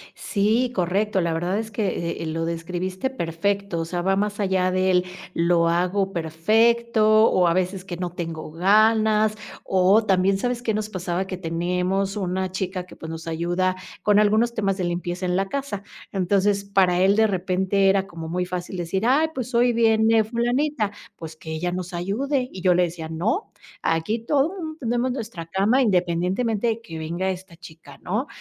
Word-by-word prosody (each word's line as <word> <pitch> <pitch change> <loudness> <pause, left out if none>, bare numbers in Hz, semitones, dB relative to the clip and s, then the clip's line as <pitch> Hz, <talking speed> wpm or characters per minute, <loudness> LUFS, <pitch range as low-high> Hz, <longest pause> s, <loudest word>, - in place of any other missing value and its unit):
Sí, 225 +5 +1
correcto. 190 +2 0
La 170 -1 0
verdad 175 +5 -1
es 220 0 -5
que, 190 -6 -2
eh, - - -3
lo 165 +1 -2
describiste 180 +7 -3
perfecto. 200 -2 -2
O 165 - -2
sea, 175 +1 -3
va 195 +2 +2
más 205 +1 -1
allá 185 -2 +1
del, 185 -1 +2 0.3
lo 170 0 +2
hago 180 +3 +1
perfecto 215 +6 +3
o 180 -1 +3
a 170 - +3
veces 185 +1 -1
que 175 -2 -6
no 180 -1 -3
tengo 165 -3 -6
ganas, 215 +4 +3 0.3
o 190 +4 +4
también, 190 0 +3
¿sabes 245 +3 -2
qué 225 -3 -1
nos 215 0 -2
pasaba? 185 -1 -3
Que 185 - -5
tenemos 180 +3 -1
una 185 -1 -2
chica 185 -1 -3
que, - - -14
pues 160 - -9
nos 165 0 -7
ayuda 175 +3 0 0.3
con 210 0 +4
algunos 215 +3 +3
temas 200 -4 0
de 185 - -2
limpieza 175 +1 -3
en 180 0 0
la 195 +1 0
casa. 270 -5 -4 0.3
Entonces, 200 +1 +1
para 190 -3 +3
él 195 +2 +4
de 220 0 +4
repente 190 +1 +1
era 195 0 +2
como 165 -4 -8
muy 180 +2 -1
fácil 180 0 -5
decir: 190 +5 -2
"Ay, 290 +6 +4
pues 255 -2 -5
hoy 240 0 +4
viene 225 -1 +4
fulanita, 240 0 0 0.2
pues 160 -1 -9
que 160 0 -9
ella 170 +3 -2
nos 180 0 -5
ayude". 250 +10 -1
Y 185 - -8
yo 180 -1 +4
le 180 +1 +3
decía: 165 -2 -4
"No, 205 - -1 0.3
aquí 165 +8 0
todos, 275 +6 +1 0.3
tendemos 245 0 0
nuestra 220 -9 -6
cama, 205 +9 +2
independientemente 190 +3 +1
de 225 0 -1
que 165 -8 -8
venga 170 +4 -2
esta 185 -2 -6
chica 165 -2 -14
¿no?". 215 +10 -2
190 Hz, 180 wpm, -23 LUFS, 175-215 Hz, 0.3 s, o